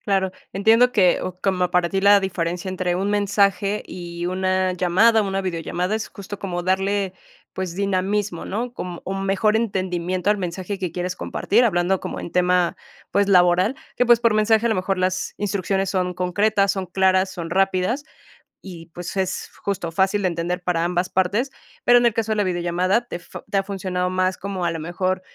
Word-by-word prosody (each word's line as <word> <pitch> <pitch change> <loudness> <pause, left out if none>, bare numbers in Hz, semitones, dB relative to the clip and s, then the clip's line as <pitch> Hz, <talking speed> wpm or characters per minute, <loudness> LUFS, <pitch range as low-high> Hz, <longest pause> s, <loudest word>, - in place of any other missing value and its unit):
Claro, 190 -2 0 0.2
entiendo 225 +5 +4
que, 185 -6 +3
o 185 0 -6
como 180 -2 0
para 180 -1 +2
ti, 190 +2 -1
la 200 0 +7
diferencia 175 -1 -3
entre 185 -1 -1
un 195 +3 -1
mensaje 200 0 +1
y 175 -1 -6
una 185 0 0
llamada, 200 +6 +4
una 195 -1 -1
videollamada 180 +1 -2
es 220 0 -3
justo 200 0 -9
como 175 -3 -3
darle, 190 +1 0 0.4
pues, 185 -2 -4
dinamismo, 195 -1 -1
¿no? 240 +4 -4
Como 180 -5 -6
un 195 0 -3
mejor 205 +3 +2
entendimiento 185 -4 -1
al 210 - +4
mensaje 185 +1 -4
que 180 -4 -3
quieres 180 +1 -3
compartir, 230 +5 +1
hablando 185 -2 +1
como - - -5
en - - -7
tema, 180 -1 +2 0.4
pues, 200 0 +2
laboral, 180 +5 +4 0.2
que, 245 - +3
pues, 240 -1 +5
por 230 -2 +3
mensaje 220 +1 +3
a - - +3
lo 220 - +2
mejor 185 0 -1
las 185 0 -1
instrucciones 195 -1 -1
son 180 -1 0
concretas, 195 +3 +1
son 190 -1 -3
claras, 190 +1 +2
son 170 -2 -6
rápidas, 195 - +1 0.6
y, 170 -4 -10
pues, 175 +3 -7
es 190 -1 -2
justo 190 -4 -2
fácil 190 +4 +1
de 185 - +3
entender 175 +1 -2
para 175 -2 0
ambas 180 +1 0
partes, 200 +8 +1 0.4
pero 245 - +7
en 240 - +3
el 235 - +3
caso 220 -1 0
de - - -2
la 210 - +2
videollamada, 180 +4 0
te 175 - -5
fu - - -10
te 200 - 0
ha 195 - +2
funcionado 185 -2 -2
más 185 0 0
como 190 -2 -4
a 170 - +1
lo 165 - -4
mejor 185 +3 -2
190 Hz, 190 wpm, -22 LUFS, 180-200 Hz, 0.6 s, la